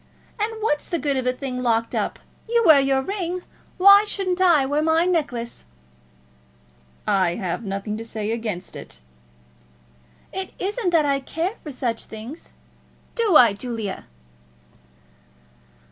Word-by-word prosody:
And 430 Hz, +2 st, 0 dB
what's 295 Hz, -9 st, 0 dB
the 340 Hz, -, 0 dB
good 285 Hz, -2 st, -1 dB
of 260 Hz, -1 st, -1 dB
a -, -, +4 dB
thing 255 Hz, -1 st, -5 dB
locked 230 Hz, -2 st, +1 dB
up? -, -, -1 dB, 0.3 s
You 470 Hz, 0 st, +3 dB
wear 310 Hz, -4 st, +8 dB
your 270 Hz, -1 st, +2 dB
ring; 365 Hz, 0 st, -3 dB, 0.3 s
why 400 Hz, +2 st, +8 dB
shouldn't 380 Hz, -3 st, -2 dB
I 335 Hz, -7 st, +5 dB
wear 290 Hz, +3 st, 0 dB
my 320 Hz, +2 st, +3 dB
necklace?" 285 Hz, -10 st, -2 dB, 1.4 s
"I 190 Hz, -4 st, +2 dB
have 185 Hz, -1 st, -3 dB
nothing 195 Hz, +1 st, -4 dB
to 225 Hz, -, -6 dB
say 220 Hz, -1 st, -4 dB
against 215 Hz, -6 st, -4 dB
it." -, -, -9 dB, 1.3 s
"It 380 Hz, -1 st, -5 dB
isn't 405 Hz, +1 st, -1 dB
that 330 Hz, -3 st, +3 dB
I 280 Hz, -1 st, +1 dB
care 325 Hz, +8 st, -3 dB
for 300 Hz, -, -7 dB
such 240 Hz, -3 st, -3 dB
things. 230 Hz, +9 st, -10 dB, 0.6 s
Do 450 Hz, -7 st, +2 dB
I, 235 Hz, -7 st, +8 dB
Julia?" 220 Hz, -2 st, -5 dB
275 Hz, 140 wpm, -23 LUFS, 230-360 Hz, 1.4 s, wear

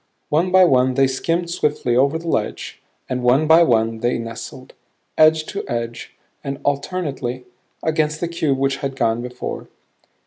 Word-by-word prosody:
One 165 Hz, +5 st, +2 dB
by 185 Hz, 0 st, +6 dB
one 130 Hz, -4 st, +3 dB
they 135 Hz, 0 st, +4 dB
skimmed 165 Hz, +6 st, -1 dB
swiftly 145 Hz, -7 st, 0 dB
over 140 Hz, +5 st, +3 dB
the 165 Hz, +1 st, -9 dB
ledge; 110 Hz, -9 st, -3 dB, 0.3 s
and 125 Hz, -1 st, -2 dB
one 125 Hz, +5 st, +3 dB
by 160 Hz, +2 st, +6 dB
one 115 Hz, -6 st, +2 dB
they 120 Hz, +2 st, 0 dB
nestled, 115 Hz, +3 st, -8 dB, 0.4 s
edge 155 Hz, 0 st, +4 dB
to 200 Hz, -, -5 dB
edge 115 Hz, 0 st, -5 dB, 0.3 s
and 135 Hz, 0 st, -4 dB
alternately, 140 Hz, -4 st, -2 dB, 0.4 s
against 155 Hz, -1 st, 0 dB
the 170 Hz, -, -1 dB
cube 155 Hz, -5 st, -1 dB
which 135 Hz, 0 st, 0 dB
had 135 Hz, -2 st, -4 dB
gone 115 Hz, -3 st, 0 dB
before. 125 Hz, 0 st, -6 dB
135 Hz, 160 wpm, -20 LUFS, 125-160 Hz, 0.4 s, by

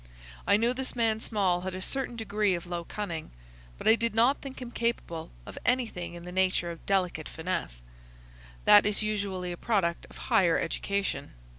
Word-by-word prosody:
I 200 Hz, -, +6 dB
knew 235 Hz, +3 st, +2 dB
this 260 Hz, 0 st, -3 dB
man 225 Hz, -2 st, +2 dB
Small 195 Hz, -6 st, +1 dB
had 185 Hz, 0 st, -4 dB
a 185 Hz, -, -5 dB
certain 270 Hz, 0 st, -1 dB
degree 210 Hz, -3 st, +1 dB
of 170 Hz, -, -6 dB
low 175 Hz, -1 st, -4 dB
cunning, 170 Hz, -7 st, -4 dB, 0.5 s
but -, -, -4 dB
I 220 Hz, -, +9 dB
did 230 Hz, -1 st, 0 dB
not 240 Hz, +5 st, +4 dB
think 270 Hz, -1 st, -7 dB
him 245 Hz, -2 st, -7 dB
capable 230 Hz, -10 st, -2 dB, 0.2 s
of -, -, -8 dB
anything 230 Hz, -9 st, 0 dB
in 170 Hz, 0 st, -9 dB
the 180 Hz, -, -7 dB
nature 185 Hz, -2 st, +1 dB
of 165 Hz, -, -10 dB
delicate 180 Hz, -5 st, 0 dB
finesse. 160 Hz, -, -4 dB, 0.8 s
That 205 Hz, 0 st, +8 dB
is 210 Hz, +1 st, +1 dB
usually 200 Hz, -4 st, -2 dB
a 175 Hz, -, -5 dB
product 180 Hz, -7 st, 0 dB
of -, -, -13 dB
higher 170 Hz, -3 st, +5 dB
education. 200 Hz, -, -2 dB
200 Hz, 180 wpm, -29 LUFS, 175-225 Hz, 0.8 s, I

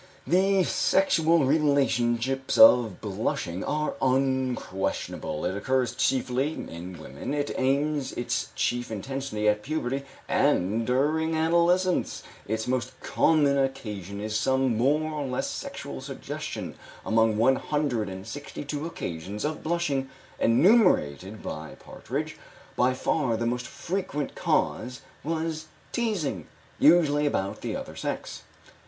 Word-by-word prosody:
The 190 Hz, +2 st, +3 dB
sexual 170 Hz, -4 st, +3 dB
relationships 135 Hz, -3 st, +1 dB
of 120 Hz, -, +7 dB
blushing 95 Hz, -3 st, -2 dB
are 150 Hz, 0 st, -1 dB
unquestionable. 130 Hz, -, -1 dB
It 90 Hz, +2 st, -1 dB
occurs 130 Hz, +4 st, 0 dB
chiefly 130 Hz, +2 st, 0 dB
in 90 Hz, -, -7 dB
women; 75 Hz, -, -5 dB
it 145 Hz, 0 st, -1 dB
attains 140 Hz, +1 st, 0 dB
its 120 Hz, -, -2 dB
chief 120 Hz, 0 st, -1 dB
intensity 110 Hz, 0 st, -3 dB
at 105 Hz, 0 st, +3 dB
puberty 135 Hz, 0 st, -2 dB, 0.3 s
and 105 Hz, +6 st, +2 dB
during 155 Hz, +5 st, +1 dB
adolescence; 170 Hz, +3 st, +2 dB, 0.2 s
its 110 Hz, +2 st, -2 dB
most 125 Hz, 0 st, -2 dB
common 145 Hz, -3 st, +3 dB
occasion 105 Hz, -7 st, -3 dB
is 105 Hz, +1 st, -3 dB
some 130 Hz, 0 st, +2 dB
more 140 Hz, +7 st, +2 dB
or 145 Hz, -2 st, -3 dB
less 125 Hz, -1 st, -2 dB
sexual -, -, -6 dB
suggestion; -, -, -6 dB, 0.3 s
among 110 Hz, -1 st, +3 dB
one 130 Hz, +4 st, +4 dB
hundred 140 Hz, -9 st, -1 dB
and 95 Hz, 0 st, -7 dB
sixty 145 Hz, +5 st, -7 dB
two 145 Hz, +2 st, -3 dB
occasions 95 Hz, -, -5 dB
of 155 Hz, +1 st, -3 dB
blushing 155 Hz, -5 st, -1 dB, 0.3 s
enumerated 115 Hz, -, +3 dB
by 80 Hz, 0 st, -6 dB
Partridge, -, -, -5 dB, 0.4 s
by 125 Hz, +1 st, +2 dB
far 130 Hz, -4 st, 0 dB
the 115 Hz, -, -2 dB
most 125 Hz, +1 st, -1 dB
frequent 175 Hz, -6 st, -3 dB
cause 125 Hz, +2 st, -1 dB, 0.2 s
was 160 Hz, 0 st, -2 dB, 0.2 s
teasing, 185 Hz, -, -2 dB, 0.3 s
usually 150 Hz, -2 st, +5 dB
about 100 Hz, -8 st, -2 dB
the -, -, -3 dB
other -, -, -6 dB
sex. -, -, -4 dB
130 Hz, 120 wpm, -27 LUFS, 110-155 Hz, 0.4 s, of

